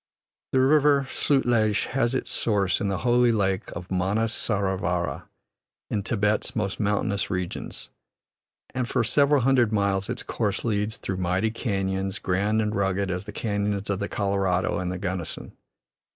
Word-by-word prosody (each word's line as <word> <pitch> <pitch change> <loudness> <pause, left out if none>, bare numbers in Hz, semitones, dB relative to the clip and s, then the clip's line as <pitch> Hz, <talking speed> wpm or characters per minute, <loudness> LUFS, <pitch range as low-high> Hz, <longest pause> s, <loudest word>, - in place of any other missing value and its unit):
The 130 - +3
River 140 0 +4
Sutlej 120 -8 +2
has 130 -1 +1
its - - -2
source 100 -5 +1
in 100 - 0
the 100 -1 0
holy 120 0 +4
lake 95 -4 0
of 90 +2 -8
Manas 100 +5 0
Saro 100 -3 0
vara, 90 -2 -2 0.6
in 105 - 0
Thibet's 105 0 0
most 100 -3 -2
mountainous 100 -1 0
regions, 90 -2 -5 0.8
and 125 -2 -2
for 125 - +1
several 140 +4 +3
hundred 125 -3 +3
miles 100 -1 0
its 125 - -3
course 105 -2 -2
leads 105 0 0
through 95 - -4
mighty 95 +4 0
canons, 95 -4 -2
grand 105 +4 +1
and 105 0 -1
rugged 95 -1 0
as 90 +2 -3
the 105 - -7
canons 100 -1 -2
of 95 - -1
the 100 - -3
Colorado 100 -3 0
and 90 -1 -2
the 90 - -3
Gunnison. 90 -3 -5
100 Hz, 155 wpm, -25 LUFS, 95-115 Hz, 0.8 s, River